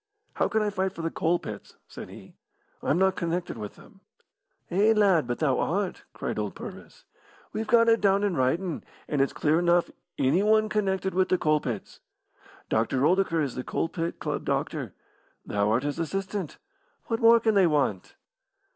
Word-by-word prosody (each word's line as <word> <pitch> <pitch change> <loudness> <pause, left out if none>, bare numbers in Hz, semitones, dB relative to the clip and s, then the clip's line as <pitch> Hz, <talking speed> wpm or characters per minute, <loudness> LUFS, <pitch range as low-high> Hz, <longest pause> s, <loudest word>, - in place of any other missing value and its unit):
"How - - +1
can 220 0 +1
I 210 - 0
fight 190 -1 -1
for 165 - -7
the 165 - -1
coal 170 +2 +1
pits?" 105 -10 -9
said - - -9
he. - - -13 0.5
"I - - -3
am 145 - +3
not 190 +1 +3
connected 170 +1 -2
with 105 -2 -7
them." - - -18 0.7
"Eh, 205 +5 +4
lad, 190 - +3
but 120 - -2
thou 135 -5 +1
art!" 190 +2 -2
cried - - -4
old - - -3
Purvis. - - -10 0.5
"We've 220 0 -3
got 230 0 +5
it 230 0 +4
down 200 0 +3
in 200 -4 +1
writin', 160 +7 0 0.2
and 145 -2 0
it's 135 - +2
clear 155 +2 +1
enough 175 0 +2 0.3
'Anyone 210 +10 +3
connected 190 -3 0
with 185 +1 +2
the 185 - +3
coal 155 -2 +2
pits.' 115 -8 -6 0.7
Doctor 125 +4 +1
Oldacre 180 -2 +2
is 140 - -3
the 125 - -5
coal 165 - -2
pit 165 0 -3
club - - -3
doctor; - - -2 0.5
thou 100 0 0
art 115 +4 +2
his 145 +2 -3
assistant. 195 +1 -3 0.5
What 225 -1 -2
more 230 0 +7
can 220 -1 +2
they 195 -3 +5
want?" 140 - 0
175 Hz, 180 wpm, -27 LUFS, 145-200 Hz, 0.7 s, more